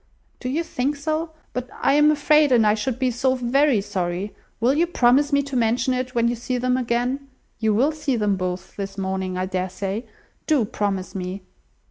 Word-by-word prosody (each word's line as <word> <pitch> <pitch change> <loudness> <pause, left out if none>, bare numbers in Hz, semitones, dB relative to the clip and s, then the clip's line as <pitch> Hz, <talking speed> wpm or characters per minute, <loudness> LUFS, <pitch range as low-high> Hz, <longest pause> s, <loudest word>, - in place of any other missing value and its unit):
"Do 250 - -4
you 310 +6 0
think 280 -2 -1
so? 310 +3 -2 0.2
But 250 0 -4
I 275 - +1
am 295 +1 +5
afraid; 300 -1 +4
and 235 -3 +5
I 210 - +5
should 230 +3 -2
be 255 -1 +1
so 260 +2 +1
very 255 -1 +2
sorry. 185 0 -3 0.3
Will 240 +4 +3
you 330 +4 +2
promise 285 -2 +3
me 280 0 +3
to 275 -1 -6
mention 240 +2 +2
it, 255 0 -3
when 235 0 +3
you 240 - 0
see 250 +2 -3
them 250 +1 +1
again? 250 +2 -1 0.3
You 220 -2 +2
will 270 +8 +3
see 300 -4 -1
them 210 -3 +1
both 185 -1 -4
this 195 0 -5
morning, 190 -1 -2
I 185 - 0
dare 185 0 -2
say. 195 +4 -4 0.4
Do 290 -8 +3
promise 200 -2 -2
me." 185 0 -5
245 Hz, 200 wpm, -23 LUFS, 200-275 Hz, 0.4 s, am